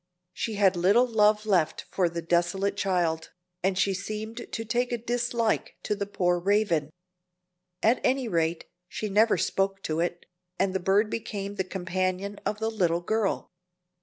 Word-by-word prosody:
She 225 - -3
had 195 -2 +4
little 200 +8 +4
love 215 -2 +3
left 180 -7 +1
for 180 -3 +2
the 170 0 -5
desolate 175 +4 +1
child, 175 -5 0 0.3
and 190 0 +1
she 195 0 +2
seemed 215 +5 -6
to 225 - -4
take 245 +2 0
a 240 - 0
dislike 235 -1 -1
to 210 - 0
the 200 -1 -3
poor 180 -3 +1
Raven. 190 -5 +1 0.9
At 230 +3 +4
any 260 -1 +1
rate, 165 -4 0 0.2
she 215 - -4
never 215 +3 +4
spoke 195 0 0
to 155 0 -1
it, 175 0 -2 0.3
and 190 -1 +1
the 190 - 0
bird 200 +4 +2
became 200 -3 -4
the 190 - -1
companion 185 +2 -2
of 210 - -1
the 220 +1 -1
little 175 -6 +1
girl. 215 +2 -1
195 Hz, 165 wpm, -27 LUFS, 180-220 Hz, 0.9 s, had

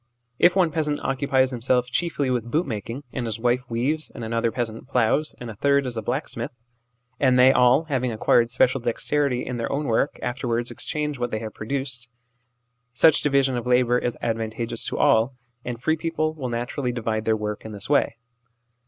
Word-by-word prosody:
If 175 +1 +5
one 180 -4 +3
peasant 150 -1 -1
occupies 135 -1 +1
himself 125 0 0
chiefly 145 -6 0
with 120 -2 -2
boot 155 +8 +1
making, 115 +3 -5
and 120 -3 -3
his 115 0 -2
wife 125 +1 0
weaves, 135 +7 0
and 120 - -9
another 115 0 0
peasant 115 0 -4
ploughs, 125 +6 +1
and 120 - -7
a 115 - -6
third 140 +5 +2
is 125 -2 -3
a 110 - -2
blacksmith, 105 - -3 0.7
and 130 -2 +4
they 130 +1 +7
all, 125 +3 +4
having 130 -6 -1
acquired 115 +1 +3
special 130 +2 +2
dexterity 125 +2 0
in 125 - -4
their 115 - -3
own 145 +2 -1
work, 120 +3 +1
afterwards 120 -1 -1
exchange 150 -3 -3
what 120 0 -1
they 110 - -2
have 110 -1 -6
produced 125 0 -3 0.8
such 155 +4 +5
division 140 -2 +2
of 120 0 -3
labour 125 0 +3
is 120 - -3
advantageous 115 0 -2
to - - -3
all, 115 +4 +3 0.3
and 120 -1 -5
free 160 - +2
people 155 -1 -1
will 135 -5 -5
naturally 120 +2 -2
divide 110 -2 -2
their 110 -1 +2
work 105 0 -4
in 110 - -8
this 100 -2 -5
way. 145 -5 +2
125 Hz, 190 wpm, -24 LUFS, 115-140 Hz, 0.8 s, they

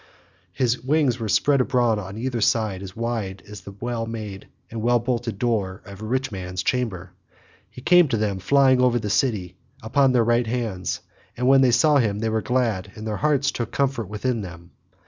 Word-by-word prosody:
His 125 -1 0
wings 135 -2 +1
were 110 -2 -3
spread 140 +6 +3
abroad 120 -4 +1
on 100 +1 -7
either 120 0 -2
side 105 -3 +1
as 95 -1 -9
wide 115 -5 -3
as 105 0 -9
the 100 - -11
well 120 -1 -3
made 105 -3 -7 0.2
and 115 -1 -5
well 120 +2 +3
bolted 120 -2 -2
door 105 -4 -1
of 100 0 -11
a - - -5
rich 130 +3 -1
man's 90 -2 -5
chamber. 100 -8 -2 0.6
He 125 - -12
came 175 0 +6
to 125 -4 0
them 105 -3 -1
flying 130 +4 +4
over 125 -1 +3
the 105 -3 -3
city 105 -7 0 0.3
upon 135 +4 +3
their 125 -2 +3
right 120 +1 +2
hands, 110 -6 -3 0.4
and 125 +1 0
when 135 0 +6
they 130 - +5
saw 145 +5 +4
him 110 -6 +1
they 110 +1 -1
were 110 0 0
glad 115 -7 -1
and 110 - -8
their 105 -2 -2
hearts 145 -2 +1
took 120 -1 -4
comfort 135 -7 -1
within 115 +2 -2
them. 85 -2 -10
115 Hz, 200 wpm, -23 LUFS, 105-125 Hz, 0.6 s, came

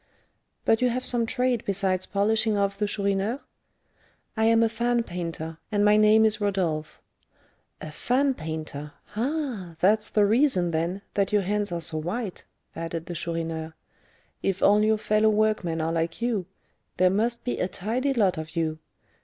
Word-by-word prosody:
But 225 - +3
you 250 - +3
have 250 +2 -2
some 235 -2 +1
trade 250 -1 +1
besides 190 -2 0
'polishing 215 +1 +1
off' 200 0 +1
the 210 +1 -1
Chourineur?" 200 +4 0 1.0
"I 220 0 +1
am 230 0 +5
a - - +4
fan 235 +1 0
painter, 165 -3 -5
and 205 -1 +2
my 210 0 +6
name 215 +1 +6
is 215 -1 +1
Rodolph." 170 -7 -1 0.8
"A 155 - -7
fan 265 - +1
painter! 155 - -6 0.2
Ah! 240 - -2
that's 215 +3 +3
the 210 -1 +3
reason, 210 - +3
then, 170 +5 -2
that 200 -1 0
your 205 -1 +3
hands 205 +1 -1
are 170 -1 -2
so 155 -1 -1
white," 185 +5 -4 0.3
added 165 0 -4
the 175 - -6
Chourineur. 165 -1 -4 0.7
"If 195 -1 -1
all 205 +1 +5
your 215 0 +3
fellow 215 +1 +2
workmen 210 -6 +1
are 165 +1 -1
like 165 0 -2
you, 230 -6 -1 0.5
there 185 0 +4
must 230 +4 0
be 245 - -2
a - - +1
tidy 245 +9 -1
lot 195 -8 +2
of 155 +1 -8
you. 160 -1 -1
200 Hz, 165 wpm, -26 LUFS, 170-220 Hz, 1.0 s, my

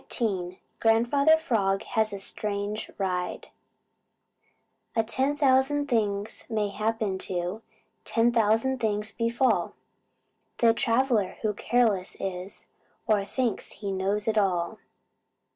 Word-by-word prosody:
XIV 185 -6 -2 0.2
GRANDFATHER 240 +8 +4
FROG 205 -11 0
HAS 220 -1 0
A 200 - -4
STRANGE 205 +1 -3
RIDE 180 -2 -2 1.5
A 225 - +3
thousand 270 +3 +2
things 210 -3 -1
may 215 -2 0
happen 215 -2 -1
to, 180 +4 -3 0.4
Ten 230 +1 +2
thousand 230 +3 +2
things 210 -2 -1
befall, 235 +3 +1 0.8
The 230 -1 +5
traveler 230 -4 +1
who 215 -1 +1
careless 215 -4 +1
is, 185 0 -6 0.4
Or 215 -4 +2
thinks 235 +1 -2
he 200 -2 -5
knows 195 +3 -1
it 220 -1 +3
all. 175 -4 0
215 Hz, 110 wpm, -27 LUFS, 195-235 Hz, 1.5 s, The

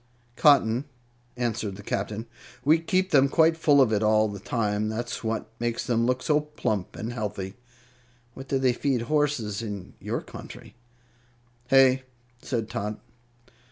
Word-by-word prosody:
"Cotton," 135 -3 +4 0.5
answered 110 -4 -2
the 105 - -11
Captain. 105 +3 -3 0.4
"We 155 +3 +5
keep 185 +3 0
them 140 -3 +5
quite 160 +2 +4
full 150 -3 +4
of 125 -5 +4
it 105 - +1
all 110 0 +4
the 100 -1 -6
time. 110 -1 -1
That's 120 +3 -4
what 110 0 -3
makes 120 0 -2
them 115 -1 +1
look 125 0 0
so 150 -1 +3
plump 110 -10 -3
and 115 +3 -5
healthy. 100 -5 -4 0.8
What 135 +2 -10
do 135 - +1
they 130 -2 +2
feed 125 -2 0
horses 130 -7 0
on 115 - -4
in 100 -3 -7
your - - -3
country?" - - -11 0.9
"Hay," 135 0 +5 0.4
said 115 -4 -2
Tot. 105 +1 -4
120 Hz, 155 wpm, -26 LUFS, 110-135 Hz, 0.9 s, We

